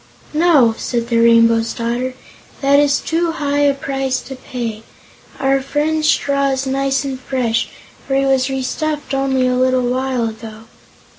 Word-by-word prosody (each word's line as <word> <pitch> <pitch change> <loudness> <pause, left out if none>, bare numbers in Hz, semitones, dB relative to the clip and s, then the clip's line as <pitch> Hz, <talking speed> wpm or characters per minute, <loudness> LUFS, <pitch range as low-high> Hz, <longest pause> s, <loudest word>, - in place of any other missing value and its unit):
"No," 300 -8 +4
said 235 -1 -2
the 230 -1 +2
Rainbow's 230 0 +4
Daughter, 245 +2 -3 0.5
"that 280 0 +4
is 285 -1 +3
too 330 0 -1
high 285 -2 -1
a 285 -1 +3
price 270 -2 -2
to 265 - -9
pay. 235 -4 -5 0.6
Our 270 0 +2
friend's 305 +3 0
straw 280 -1 +1
is 265 0 -1
nice 270 +1 0
and 270 -2 -4
fresh, 245 -3 -1 0.4
for 270 - 0
he 275 0 +2
was 265 -1 +2
restuffed 290 +2 -3
only 270 -1 +1
a 250 - +1
little 255 0 +2
while 255 -1 -1
ago." 220 0 -9
265 Hz, 155 wpm, -18 LUFS, 245-280 Hz, 0.6 s, No